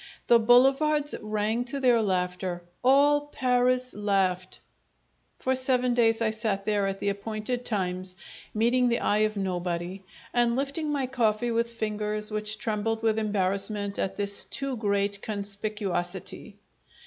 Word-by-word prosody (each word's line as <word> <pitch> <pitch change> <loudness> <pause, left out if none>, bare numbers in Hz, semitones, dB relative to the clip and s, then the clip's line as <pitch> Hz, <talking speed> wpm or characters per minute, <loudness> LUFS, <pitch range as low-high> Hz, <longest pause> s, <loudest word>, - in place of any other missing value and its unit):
The 235 - +6
boulevards 270 +6 +4
rang 215 +2 -1
to 275 +3 0
their 245 -3 +4
laughter 180 -2 -2 0.2
all 290 +3 +4
Paris 255 -1 +1
laughed! 190 -3 0 0.8
For 260 0 0
seven 255 -1 +2
days 230 -1 +3
I 220 - +2
sat 215 -3 -2
there 205 -2 +1
at 195 0 -3
the 200 - -1
appointed 215 +4 -3
times, 185 -3 -1 0.4
meeting 240 +3 +2
the 235 - +1
eye 210 - +1
of 215 - -10
nobody, 180 -1 -3 0.3
and 240 -1 +2
lifting 280 +3 -2
my 280 -3 0
coffee 240 -2 0
with 230 0 0
fingers 210 -1 -2
which 215 0 -1
trembled 220 +1 -2
with 220 -1 +2
embarrassment 200 0 -1
at 190 - -1
this 200 0 0
too 275 -1 -2
great 200 -2 0
conspicuosity! 200 -3 -3
215 Hz, 135 wpm, -27 LUFS, 200-245 Hz, 0.8 s, The